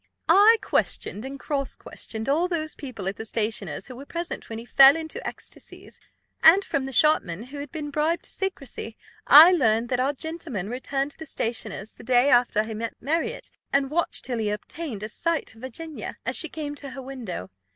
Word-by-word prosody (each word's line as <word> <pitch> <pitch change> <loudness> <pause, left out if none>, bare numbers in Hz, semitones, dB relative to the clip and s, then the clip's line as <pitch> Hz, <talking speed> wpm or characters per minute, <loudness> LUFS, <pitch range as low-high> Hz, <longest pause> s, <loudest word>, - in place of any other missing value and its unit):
I 430 +4 +7
questioned 210 +5 -1
and 275 +1 -7
cross 275 -1 -2
questioned 220 +1 -7
all 315 +6 +2
those 315 -4 -2
people 245 -9 -7
at 195 - -3
the - - -5
stationer's 210 -7 -2
who 255 - -9
were 275 +3 -10
present 340 0 -5
when 225 - -5
he 230 - -8
fell 270 +3 +8
into 320 -1 -5
ecstasies; - - -9 0.4
and, 375 +5 +7
from 270 -1 -1
the - - -6
shopman, 230 - +3
who 280 +4 -8
had 285 -1 -7
been 295 -2 -5
bribed 310 +4 0
to - - -8
secrecy, 275 - -4 0.3
I 315 +5 +10
learned 230 -8 +2
that 250 - 0
our 270 +3 +1
gentleman 290 - -4
returned 270 +3 -2
to - - -19
the 320 - -8
stationer's 220 -4 -3
the - - -14
day 250 +3 +4
after 240 -3 +4
he 220 0 -6
met 225 +1 -4
Marriott, 335 - -2 0.2
and 275 0 +1
watched 340 +2 0
till 245 -3 -2
he 215 -1 0
obtained 210 +2 -5
a - - -2
sight 335 +4 -1
of 225 - -17
Virginia, 300 +5 -7
as - - 0
she 330 - +1
came 295 -2 -5
to 280 - -5
her 270 - -8
window. 240 - -6
270 Hz, 200 wpm, -25 LUFS, 225-310 Hz, 0.4 s, I